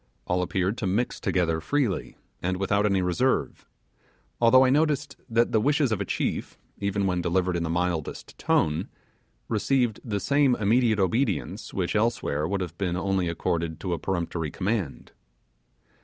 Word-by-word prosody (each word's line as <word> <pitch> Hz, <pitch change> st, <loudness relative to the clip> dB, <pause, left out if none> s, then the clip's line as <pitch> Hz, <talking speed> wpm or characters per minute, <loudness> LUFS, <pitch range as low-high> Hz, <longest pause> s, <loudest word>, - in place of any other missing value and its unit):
All 90 Hz, +1 st, 0 dB
appeared 95 Hz, +4 st, -1 dB
to 110 Hz, -, -1 dB
mix 105 Hz, +7 st, -1 dB
together 80 Hz, -3 st, 0 dB
freely, 125 Hz, -, -1 dB, 0.2 s
and 90 Hz, +1 st, -1 dB
without 100 Hz, +2 st, +1 dB
any 95 Hz, -2 st, +1 dB
reserve; 105 Hz, +9 st, 0 dB, 0.7 s
although 130 Hz, +3 st, +7 dB
I 130 Hz, -, +3 dB
noticed 150 Hz, -1 st, +1 dB
that 115 Hz, +1 st, +2 dB
the 110 Hz, -, +3 dB
wishes 145 Hz, 0 st, +2 dB
of 105 Hz, -2 st, 0 dB
a -, -, -1 dB
chief, -, -, -2 dB, 0.2 s
even 100 Hz, 0 st, 0 dB
when 90 Hz, -2 st, 0 dB
delivered 90 Hz, +1 st, 0 dB
in 85 Hz, -, -1 dB
the 85 Hz, -, -2 dB
mildest 85 Hz, -2 st, -2 dB
tone, 80 Hz, +4 st, +1 dB, 0.6 s
received 120 Hz, 0 st, +1 dB
the 105 Hz, -5 st, -2 dB
same 140 Hz, +1 st, +3 dB
immediate 110 Hz, +1 st, +2 dB
obedience 105 Hz, +4 st, -1 dB
which 90 Hz, 0 st, -2 dB
elsewhere 105 Hz, -9 st, 0 dB
would 100 Hz, +1 st, -1 dB
have 85 Hz, -3 st, -5 dB
been 90 Hz, -3 st, -1 dB
only 95 Hz, -1 st, 0 dB
accorded 85 Hz, -1 st, -2 dB
to 90 Hz, -, -2 dB
a 85 Hz, -, -2 dB
peremptory 85 Hz, -4 st, -2 dB
command. 95 Hz, -1 st, -3 dB
95 Hz, 155 wpm, -26 LUFS, 90-115 Hz, 0.7 s, although